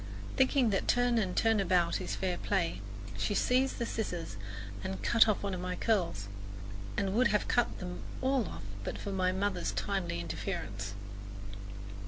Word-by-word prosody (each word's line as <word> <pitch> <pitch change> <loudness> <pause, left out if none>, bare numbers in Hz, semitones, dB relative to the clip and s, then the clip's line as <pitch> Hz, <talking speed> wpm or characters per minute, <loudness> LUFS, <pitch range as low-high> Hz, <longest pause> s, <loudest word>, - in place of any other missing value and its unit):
Thinking 260 -3 +4
that 195 - +1
turn 245 -1 +4
and 185 -4 -1
turn 225 -1 +4
about 180 -3 +3
is - - -2
fair 185 -2 0
play, 170 - 0 0.4
she 205 - +1
seized 260 +4 +3
the 235 - 0
scissors 175 - -3 0.5
and 95 +1 -3
cut 230 -1 +6
off 215 -2 +2
one 200 -1 -1
of 180 - -3
my 180 0 -2
curls, 175 - +1 0.7
and 195 -1 +1
would 245 +4 +5
have 210 -2 +2
cut 240 - +2
them 180 -1 -5 0.2
all 260 -5 +2
off 80 +4 -7 0.2
but - - -3
for 200 - -4
my 185 -1 +2
mother's 190 -1 0
timely 195 - -1
interference. 100 +3 -3
195 Hz, 165 wpm, -32 LUFS, 175-225 Hz, 0.7 s, cut